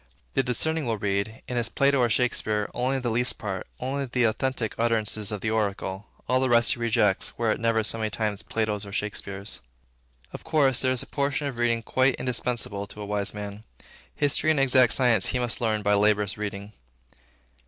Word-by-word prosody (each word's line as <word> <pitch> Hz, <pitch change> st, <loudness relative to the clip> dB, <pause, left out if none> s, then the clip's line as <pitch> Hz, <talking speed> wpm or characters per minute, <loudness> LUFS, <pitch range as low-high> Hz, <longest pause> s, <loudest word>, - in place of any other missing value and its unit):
The 135 Hz, -, +3 dB
discerning 140 Hz, +4 st, -1 dB
will 115 Hz, -1 st, 0 dB
read, 100 Hz, +2 st, -2 dB
in 125 Hz, -, -3 dB
his 115 Hz, -1 st, 0 dB
Plato 140 Hz, +3 st, +2 dB
or 120 Hz, -1 st, +3 dB
Shakespeare, 110 Hz, -3 st, 0 dB
only 130 Hz, +2 st, 0 dB
that 125 Hz, -2 st, -3 dB
least 120 Hz, +2 st, +2 dB
part, 95 Hz, -4 st, -5 dB
only 135 Hz, +2 st, -2 dB
the 125 Hz, -1 st, 0 dB
authentic 115 Hz, 0 st, 0 dB
utterances 110 Hz, -3 st, +1 dB
of 105 Hz, -2 st, -4 dB
the 110 Hz, -, -1 dB
oracle; 100 Hz, -2 st, -2 dB, 0.2 s
all 130 Hz, -, +3 dB
the 130 Hz, 0 st, +1 dB
rest 120 Hz, 0 st, +5 dB
he 125 Hz, -, -8 dB
rejects, 115 Hz, -4 st, +1 dB
were 115 Hz, -2 st, +1 dB
it -, -, -1 dB
never 115 Hz, -1 st, +1 dB
so 115 Hz, +1 st, -1 dB
many 110 Hz, -1 st, -1 dB
times 105 Hz, -1 st, -2 dB
Plato's 110 Hz, -2 st, -2 dB
and 100 Hz, -1 st, -7 dB
Shakespeare's. 100 Hz, -9 st, -2 dB, 0.7 s
Of -, -, -8 dB
course, 140 Hz, -6 st, +2 dB
there 130 Hz, -, +2 dB
is 130 Hz, -, -1 dB
a -, -, -10 dB
portion 140 Hz, +1 st, -1 dB
of 135 Hz, -4 st, -4 dB
reading 115 Hz, -1 st, +1 dB
quite 130 Hz, +2 st, +2 dB
indispensable 120 Hz, -5 st, -2 dB
to 105 Hz, -, -10 dB
a -, -, -4 dB
wise 100 Hz, -1 st, 0 dB
man. 105 Hz, 0 st, -7 dB, 0.5 s
History 145 Hz, +2 st, +1 dB
and 155 Hz, -2 st, +3 dB
exact 130 Hz, -4 st, +5 dB
science 120 Hz, -6 st, +3 dB
he 125 Hz, -, 0 dB
must 120 Hz, -1 st, 0 dB
learn 110 Hz, -2 st, 0 dB
by 105 Hz, 0 st, +3 dB
laborious 105 Hz, -1 st, +2 dB
reading. 105 Hz, 0 st, -6 dB
115 Hz, 195 wpm, -26 LUFS, 105-125 Hz, 0.7 s, rest